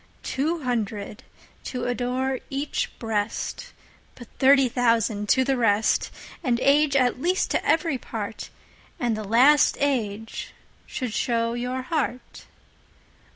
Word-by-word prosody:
Two 310 +4 -1
hundred 215 -4 -3 0.4
to 250 -2 -4
adore 250 +1 -1
each 275 +2 -2
Breast:But 225 +2 -5
thirty 270 -1 +6
thousand 230 -4 +1
to 260 - +4
the 270 +1 +1
rest. 220 -3 +2 0.3
An 245 -5 +1
Age 285 +1 +3
at 255 -1 +2
least 360 +4 +1
to - - 0
every 320 -4 +1
part, 220 -2 -6 0.5
And 240 -3 0
the 215 - -5
last 255 +8 +5
Age 225 -6 -2 0.3
should 250 -4 -4
show 230 -2 0
your 250 +2 -3
Heart. 260 -4 -4
250 Hz, 115 wpm, -25 LUFS, 225-270 Hz, 0.5 s, thirty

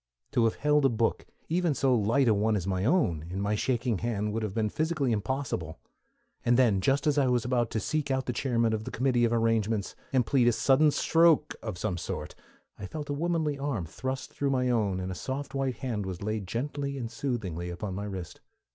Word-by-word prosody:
To 120 - +3
have 115 - +1
held 150 0 +2
a 135 - +5
book, 115 -1 0 0.2
even 170 -2 +1
so 135 -1 +2
light 120 +4 +3
a 110 - +5
one 105 +2 +2
as 95 -4 -2
my 95 0 -1
own, 115 - +2
in 95 +2 -4
my 100 +1 0
shaking 120 -1 0
hand 105 -3 -1
would 115 - -1
have 105 -3 -3
been 110 -2 +1
physically 155 +1 0
impossible, 105 - -2 0.7
and 120 0 +3
then, 110 -7 +4
just 135 - +2
as 150 -1 +3
I 135 - +3
was 125 -2 +1
about 120 -2 +1
to 110 - -1
seek 150 +3 -1
out 130 -1 0
the 125 - -2
chairman 115 -3 +1
of 110 0 -2
the - - -4
committee 125 -1 +2
of 115 - +1
arrangements, 115 -3 +1 0.2
and 130 -3 +2
plead 125 -1 +3
a 120 - +5
sudden 140 +6 +4
stroke 160 0 +3
of 110 -6 -5
some 90 -2 -2
sort, - - -5 0.5
I 100 - -5
felt 145 +5 -5
a - - 0
womanly 155 -2 -1
arm 135 -11 -2
thrust 130 +11 -5
through 140 - -1
my 125 -2 +1
own, 105 -6 +1
and 95 0 -3
a - - -3
soft 135 +9 -5
white 135 -2 -1
hand 110 -7 -3
was 95 0 -5
laid 110 -2 -2
gently 140 +5 -3
and 115 -3 -4
soothingly 110 - -3
upon 90 +3 -5
my 100 +2 -4
wrist. 95 -4 -7
120 Hz, 220 wpm, -29 LUFS, 105-135 Hz, 0.7 s, a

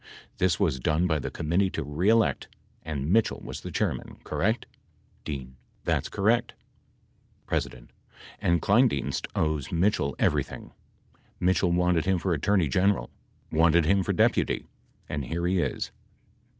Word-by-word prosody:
This 90 -3 +3
teas 65 - 0
done 75 +7 +1
by 80 -4 +1
the - - -4
Committee 85 +5 0
to 80 - -4
Re 75 +8 0
Elect, 115 -1 +2 0.3
and 75 +1 -2
Mitchell 115 0 +2
was - - -7
the - - -7
Chairman, - - -2
correct 110 +5 0
f - - -33 0.5
D. 70 -4 -5 0.3
That's - - 0
correct! 115 +4 +1 0.9
P. - - +1 0.8
And 85 -2 +2
Kleindienst 105 - +2
owes 75 -3 -1
Mitchell 85 -6 +1
everything. - - -1 0.7
Mitchell 90 0 +2
wanted 90 -1 +2
him 95 -1 +2
for 90 +1 0
Attorney 90 +2 +2
General. 95 +8 +1 0.4
Wanted 80 +1 +4
him 100 +4 +3
for 90 - -1
Deputy, - - +2 0.4
and 75 -3 -3
here 85 +7 -2
he 90 +1 +2
is. 70 -5 -2
85 Hz, 140 wpm, -27 LUFS, 75-95 Hz, 0.9 s, Wanted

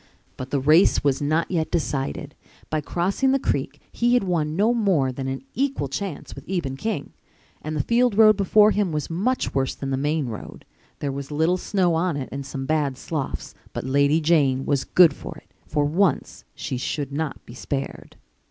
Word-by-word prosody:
But 130 0 -7
the 140 - 0
race 155 +7 +4
was 140 -1 +1
not 155 +5 0
yet 160 -3 0
decided. 145 -2 -2 0.4
By 155 -1 0
crossing 195 - 0
the - - +4
creek 140 - -2
he 240 +1 +2
had 245 - +3
won 160 -5 -1
no 215 +6 +3
more 190 - +2
than 130 +1 -5
an 135 - -4
equal 270 - -1
chance 160 +3 -5
with 140 - -10
Eben 165 -8 -2
King. 195 -1 -4 0.5
And 155 0 -4
the 145 - 0
field 235 - +2
road 215 -1 +7
before 210 +2 +5
him 205 -4 0
was 150 +1 -3
much 235 +10 0
worse 135 -1 0
than 135 -1 -5
the 135 - 0
main 150 +2 0
road. 110 -4 -8 0.3
There 140 - -3
was 140 0 -6
little 160 +4 +1
snow 185 -2 +1
on 165 -1 0
it 135 - -5
and 140 +1 -4
some 135 0 -5
bad 145 -3 0
sloughs. 145 -1 -4 0.2
But - - -4
Lady 140 +4 +3
Jane 145 -5 +2
was 140 -2 0
good 175 -5 +6
for - - -9
it. - - -19
For 150 -1 +1
once 175 +6 0
she 130 - -4
should 140 +2 -3
not 150 +1 -4
be 115 - -11
spared. 135 +2 -5
155 Hz, 195 wpm, -24 LUFS, 140-185 Hz, 0.5 s, road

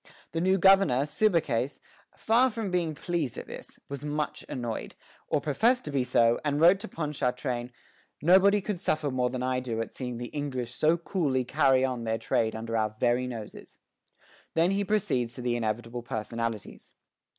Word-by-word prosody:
The 165 +2 -2
new 190 +2 +3
governor, 190 -8 +5
Subercase, 150 - +1 0.4
far 240 +4 +3
from 220 -4 -4
being 170 -4 0
pleased 165 -6 -2
at - - -6
this, - - -9
was 140 0 -6
much 150 0 -3
annoyed, 120 -3 -4 0.3
or - - +1
professed 225 - +2
to 150 - -4
be 135 -2 +1
so, 120 -2 +3
and 145 -1 0
wrote 175 +4 +6
to 225 - -7
Ponchartrain, 130 - -2 0.5
"Nobody 195 +5 +5
could 190 -2 -3
suffer 155 -4 0
more 125 -1 +1
than 125 0 -4
I 130 0 0
do 120 -3 -3
at 115 - -4
seeing 125 -2 -5
the 120 0 -6
English 130 -5 -4
so 155 +7 +3
coolly 155 -7 -1
carry 135 -1 +3
on 125 -2 -3
their 110 -1 -1
trade 110 0 0
under 115 +1 -4
our 110 -1 0
very 125 +1 +2
noses." 115 -4 -8 0.8
Then 165 +3 +3
he 200 +1 +1
proceeds 130 - 0
to 125 - -7
the 120 -1 0
inevitable 115 +1 -3
personalities. 115 -2 -5
135 Hz, 175 wpm, -28 LUFS, 120-170 Hz, 0.8 s, wrote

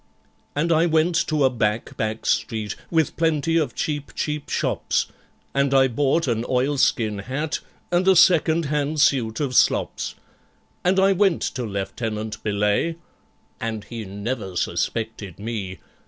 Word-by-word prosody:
And 165 +4 +1
I 165 +1 +4
went 160 +2 +2
to 155 -3 +1
a 130 - +4
back 110 -2 -1
back 110 0 -3
street, 110 -3 -1
with 160 -4 +1
plenty 165 0 +1
of 155 -3 0
cheap 145 -2 -3
cheap 150 -1 -3
shops, - - 0 0.5
And 140 0 +2
I 135 0 +6
bought 140 +6 +1
an 115 -2 0
oilskin 130 -5 +1
hat 135 +8 -3 0.3
and 175 +2 +2
a 190 - +6
second 165 -2 +5
hand 150 +1 -1
suit 120 -6 +2
of 140 -4 -1
slops, - - +2 0.7
And 185 +2 +3
I 195 +1 +5
went 195 -2 +2
to 125 -3 -3
LIEUTENANT 110 +2 -4
BELAYE 105 +10 +1 0.6
(and 110 -2 -3
he 115 0 -7
never 100 0 -4
suspected 105 0 -2
me!) 100 -3 -5
130 Hz, 140 wpm, -23 LUFS, 110-155 Hz, 0.7 s, I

